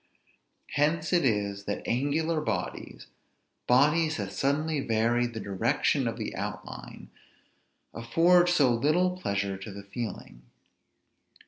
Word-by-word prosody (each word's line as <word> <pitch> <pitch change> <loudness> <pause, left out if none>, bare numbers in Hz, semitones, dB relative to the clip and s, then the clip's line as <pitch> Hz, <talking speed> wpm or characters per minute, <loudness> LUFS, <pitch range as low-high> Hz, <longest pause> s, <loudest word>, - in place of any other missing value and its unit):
Hence 155 +3 +1
it 175 - +4
is 100 -4 0
that 100 - -4
angular 155 +6 0
bodies, 105 -10 -4 0.6
bodies 150 +5 +3
that 100 -2 -4
suddenly 150 +2 0
vary 120 0 +1
the 115 -2 -7
direction 100 -2 0
of - - -3
the - - -5
outline, - - -7 0.8
afford 170 +10 +3
so 145 -8 +4
little 165 +9 +2
pleasure 100 - -2
to 105 +2 -8
the 100 +1 -9
feeling. 100 - -7
125 Hz, 115 wpm, -28 LUFS, 100-155 Hz, 0.8 s, it